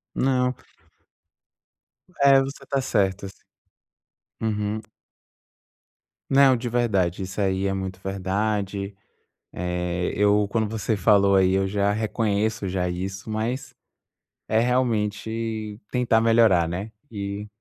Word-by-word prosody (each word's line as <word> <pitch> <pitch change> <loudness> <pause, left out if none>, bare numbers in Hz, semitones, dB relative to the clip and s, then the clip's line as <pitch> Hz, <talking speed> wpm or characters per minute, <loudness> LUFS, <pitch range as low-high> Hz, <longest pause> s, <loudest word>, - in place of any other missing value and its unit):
Não. 125 -1 +1 1.7
É, 140 -1 +7
você 135 +1 -5
está 135 0 -1
certo 100 -5 0
assim. 95 - -7 1.1
Uhum. 105 -1 -1 1.5
Não 135 -1 +5
de 120 +1 -4
verdade. 100 -7 0
Isso 95 +2 -6
aí 95 -1 +1
é 95 - 0
muito 95 -1 -4
verdade. 100 +1 -2 0.6
Eh 90 0 -2
eu 105 +1 +3
quando 110 0 0
você 110 0 -1
falou 100 -1 +4
aí 95 -1 +4
eu 95 0 +2
já 100 +1 +1
reconheço 110 -1 -1
já 90 -1 -1
isso, 95 +3 -5
mas 110 +5 -3 0.7
é 110 - +2
realmente 110 -2 -1
tentar 125 -3 +2
melhorar, 115 -7 +4
né? 95 +6 -4 0.2
E 100 0 -5
105 Hz, 110 wpm, -24 LUFS, 95-115 Hz, 1.7 s, É